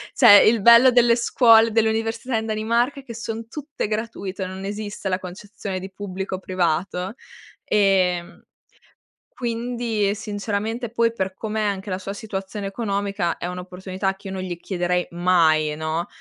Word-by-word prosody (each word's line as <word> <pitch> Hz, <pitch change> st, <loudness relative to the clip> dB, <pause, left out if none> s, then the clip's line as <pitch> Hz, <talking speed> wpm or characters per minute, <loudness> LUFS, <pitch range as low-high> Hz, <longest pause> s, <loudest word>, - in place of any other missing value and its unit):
Cioè, 215 Hz, -5 st, +8 dB
il 225 Hz, -1 st, +3 dB
bello 235 Hz, +4 st, +8 dB
delle 240 Hz, -1 st, +5 dB
scuole, 230 Hz, -2 st, +5 dB
dell'università 225 Hz, +2 st, 0 dB
in 220 Hz, -, -2 dB
Danimarca 230 Hz, +5 st, 0 dB
è -, -, -26 dB
che 235 Hz, -3 st, -9 dB
son 225 Hz, -1 st, -5 dB
tutte 290 Hz, -2 st, -5 dB
gratuite, 210 Hz, -3 st, -4 dB
non 190 Hz, +1 st, -7 dB
esiste 205 Hz, 0 st, -5 dB
la 185 Hz, 0 st, 0 dB
concezione 195 Hz, +1 st, -7 dB
di 190 Hz, +1 st, -8 dB
pubblico 190 Hz, -1 st, -5 dB
o -, -, -7 dB
privato. 185 Hz, +2 st, -1 dB, 0.5 s
Ehm, 185 Hz, -3 st, +1 dB, 0.9 s
quindi 235 Hz, -3 st, -1 dB
sinceramente 215 Hz, +2 st, -3 dB
poi 230 Hz, 0 st, +1 dB
per 190 Hz, -4 st, -3 dB
come 220 Hz, +2 st, -4 dB
è -, -, 0 dB
anche 200 Hz, 0 st, -3 dB
la 185 Hz, -, -1 dB
sua 195 Hz, +1 st, -6 dB
situazione 200 Hz, -1 st, -5 dB
economica, 200 Hz, -4 st, -2 dB
è -, -, -4 dB
un'opportunità 185 Hz, +2 st, -4 dB
che 195 Hz, +1 st, -12 dB
io -, -, -5 dB
non 190 Hz, -1 st, -4 dB
gli 180 Hz, -2 st, -5 dB
chiederei 180 Hz, -1 st, -1 dB
mai, 165 Hz, -4 st, +2 dB
no, 160 Hz, +2 st, -3 dB
200 Hz, 155 wpm, -22 LUFS, 185-225 Hz, 0.9 s, Cioè